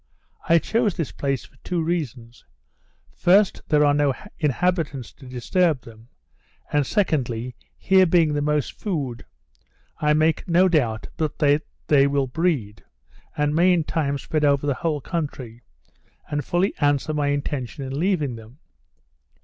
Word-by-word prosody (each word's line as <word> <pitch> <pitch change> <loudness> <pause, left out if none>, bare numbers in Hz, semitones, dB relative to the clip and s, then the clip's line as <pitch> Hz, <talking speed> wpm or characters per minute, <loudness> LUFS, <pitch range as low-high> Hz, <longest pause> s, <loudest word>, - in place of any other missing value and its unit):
I 170 - +7
chose 220 +3 0
this 165 - -2
place 135 -2 -2
for - - -23
two 180 -2 -3
reasons; 135 -9 -4 0.7
first, 195 +3 +3
here 150 -1 +4
are 145 - +4
no 145 -2 +2 0.2
inhabitants 150 -3 -1
to 135 - -15
disturb 140 +4 0
them; 115 0 -15 0.7
and, 145 -2 +2
secondly, 125 - -1 0.2
here 190 -1 +4
being 165 -3 +3
the 145 - 0
most 150 -1 0
food, 140 - -4 0.7
I 150 0 +3
make 155 +1 +1
no 180 +2 +4
doubt 120 -11 0
but 155 -3 -2
that 145 0 +2 0.2
they 140 -2 +4
will 140 -1 +1
breed, 130 - -1 0.5
and 150 0 +1
may 175 +4 +4
in 170 -2 +1
time 145 -3 -1
spread 155 +2 -2
over 140 -1 +3
the 145 - +1
whole 150 +2 -2
country, 135 -9 -5 0.7
and 145 0 -1
fully 180 +3 0
answer 145 +1 +1
my 145 -1 0
intention 145 -1 -3
in 135 +1 -4
leaving 155 -9 0
them. 115 +4 -14
145 Hz, 150 wpm, -23 LUFS, 135-165 Hz, 0.7 s, I